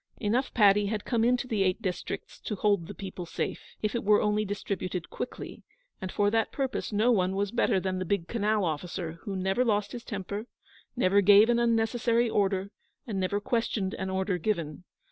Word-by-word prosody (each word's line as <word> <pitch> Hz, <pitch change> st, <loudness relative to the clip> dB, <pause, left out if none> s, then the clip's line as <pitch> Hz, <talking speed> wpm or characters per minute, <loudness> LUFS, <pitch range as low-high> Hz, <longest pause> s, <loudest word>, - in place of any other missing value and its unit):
Enough 235 Hz, +5 st, 0 dB
paddy 205 Hz, -2 st, +5 dB
had 210 Hz, 0 st, -3 dB
come 230 Hz, -3 st, +1 dB
into 250 Hz, +2 st, +2 dB
the 220 Hz, -5 st, 0 dB
Eight 185 Hz, +1 st, +2 dB
Districts 185 Hz, -5 st, -5 dB
to 210 Hz, -, -4 dB
hold 200 Hz, -4 st, +1 dB
the -, -, -8 dB
people 185 Hz, -3 st, -7 dB
safe, -, -, -3 dB, 0.2 s
if 215 Hz, -, 0 dB
it 235 Hz, -, -2 dB
were 210 Hz, +1 st, +5 dB
only 210 Hz, 0 st, +1 dB
distributed 190 Hz, -3 st, -4 dB
quickly; -, -, -6 dB, 0.4 s
and 185 Hz, -1 st, -4 dB
for 205 Hz, 0 st, +2 dB
that 225 Hz, -1 st, +1 dB
purpose 270 Hz, -4 st, -2 dB
no 215 Hz, +4 st, +3 dB
one 190 Hz, -4 st, +2 dB
was 200 Hz, 0 st, -1 dB
better 215 Hz, -5 st, +2 dB
than 185 Hz, 0 st, -2 dB
the -, -, -1 dB
big 180 Hz, -2 st, -1 dB
Canal 215 Hz, -3 st, +1 dB
officer, 165 Hz, +1 st, -4 dB
who 200 Hz, -3 st, -3 dB
never 190 Hz, +6 st, +1 dB
lost 210 Hz, -3 st, 0 dB
his 240 Hz, -1 st, -7 dB
temper, 205 Hz, 0 st, -5 dB, 0.5 s
never 200 Hz, -4 st, +4 dB
gave 205 Hz, +4 st, +7 dB
an 235 Hz, -, +2 dB
unnecessary 235 Hz, 0 st, +2 dB
order, 195 Hz, -2 st, 0 dB, 0.3 s
and 210 Hz, -5 st, -3 dB
never 190 Hz, +2 st, 0 dB
questioned 205 Hz, -3 st, -1 dB
an 190 Hz, 0 st, -4 dB
order 190 Hz, -1 st, -1 dB
given. 170 Hz, -4 st, -2 dB
205 Hz, 190 wpm, -28 LUFS, 190-225 Hz, 0.5 s, gave